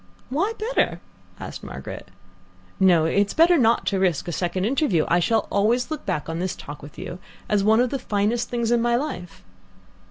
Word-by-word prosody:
"Why 375 +11 0
better?" 460 +4 0 0.4
asked - - -8
Margaret. - - -8 0.7
"No, 175 -4 +5
it 200 +5 +2
is - - -7
better 335 +2 +6
not 235 -6 +3
to 195 - 0
risk 180 -5 +1
a - - -2
second 185 +2 -1
interview. 230 - +1
I 175 - +3
shall 220 +6 +1
always 230 +8 +1
look 310 - -5
back 150 - -2
on 165 +1 -3
this 185 +1 -2
talk 145 +1 -9
with 145 - -12
you 180 0 -7 0.3
as 205 -2 +2
one 220 +2 +4
of 250 0 +2
the 275 - -2
finest 215 +2 0
things 235 -1 -1
in 240 -1 +3
my 240 0 +2
life. 235 - -4
210 Hz, 195 wpm, -23 LUFS, 180-245 Hz, 0.7 s, better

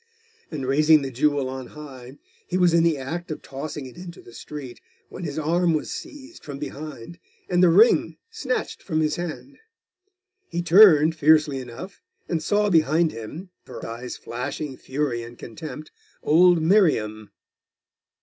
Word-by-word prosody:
And 145 -5 -5
raising 150 +3 +4
the 135 - -4
jewel 140 +1 +1
on 130 -1 -6
high, 135 -3 -11 0.3
he 180 - -1
was 180 -2 +3
in 170 - +5
the 165 -2 +2
act 160 +6 -5
of 155 - -6
tossing 140 +1 -6
it 130 - -12
into 175 -1 -10
the 120 - -15
street, 135 -2 -9 0.3
when 180 - -7
his 145 -1 -5
arm 165 +2 +1
was 150 - -3
seized 295 +2 -9
from 145 -2 -7
behind, 150 +1 -8 0.3
and 175 -1 +1
the 180 - +6
ring 205 +8 +4
snatched 265 - -3
from 160 -4 -2
his 155 -1 0
hand. 175 - -7 0.9
He 175 - -3
turned, 165 -4 +7
fiercely 155 -2 +3
enough, 130 +10 -9 0.3
and 165 -2 -1
saw 205 +4 +1
behind 160 0 +3
him, 150 - -9 0.2
her - - -8
eyes 120 +2 -7
flashing 130 +4 -5
fury 130 -3 -3
and 120 +1 -10
contempt, 150 +6 -9 0.3
old 170 +1 +5
Miriam. 110 - +2
155 Hz, 155 wpm, -24 LUFS, 135-175 Hz, 0.9 s, turned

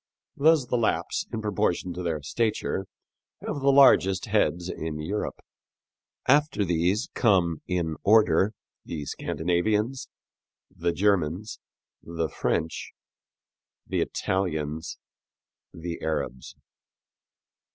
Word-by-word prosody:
Thus 155 -2 +4
the 125 - 0
Lapps, 115 - 0
in 110 - -4
proportion 90 -3 0
to 90 - -5
their 80 -4 -2
stature, 105 -1 -1 0.6
have - - -3
the 140 0 +4
largest 95 -9 +5
heads 85 +1 +1
in 80 -4 -4
Europe. 95 +8 -3 0.9
After 145 -6 +3
these 90 +7 +1
come 90 - +2
in 85 -4 -1
order 105 -2 +4 0.3
the 75 -3 -5
Scandinavians, 105 - -1 0.7
the 85 -1 0
Germans, 95 0 0 0.4
the 85 -1 -3
French, 80 +3 -2 0.9
the - - -1
Italians, 80 -4 -2 0.7
the 85 0 -6
Arabs. 70 -5 -3
90 Hz, 100 wpm, -26 LUFS, 80-110 Hz, 0.9 s, largest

